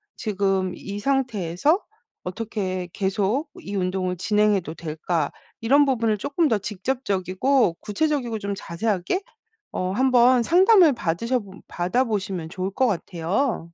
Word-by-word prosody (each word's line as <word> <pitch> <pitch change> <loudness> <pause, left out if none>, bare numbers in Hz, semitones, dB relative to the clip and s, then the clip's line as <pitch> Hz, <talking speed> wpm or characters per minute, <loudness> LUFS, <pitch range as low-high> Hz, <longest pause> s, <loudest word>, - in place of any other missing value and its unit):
지금 195 -3 0
이 200 +1 -6
상태에서 255 - +1 0.4
어떻게 185 -2 -3
계속 205 - 0
이 205 - -6
운동을 185 -1 -1
진행해도 205 -3 +1
될까." 160 -1 -2 0.3
이런 280 +5 +5
부분을 230 -5 +1
조금 295 - 0
더 225 -6 +2
직접적이고 205 +1 0
구체적이고 240 -1 -1
좀 200 -1 -3
자세하게 190 - -1 0.5
어 185 0 -1
한번 250 +2 +4
상담을 365 - +6
받으셔봄 200 +2 -2
받아보시면 190 -3 -1
좋을 185 +2 -3
것 260 +3 +2
같아요. 190 - -1
205 Hz, 290 characters per minute, -24 LUFS, 185-255 Hz, 0.5 s, 상담을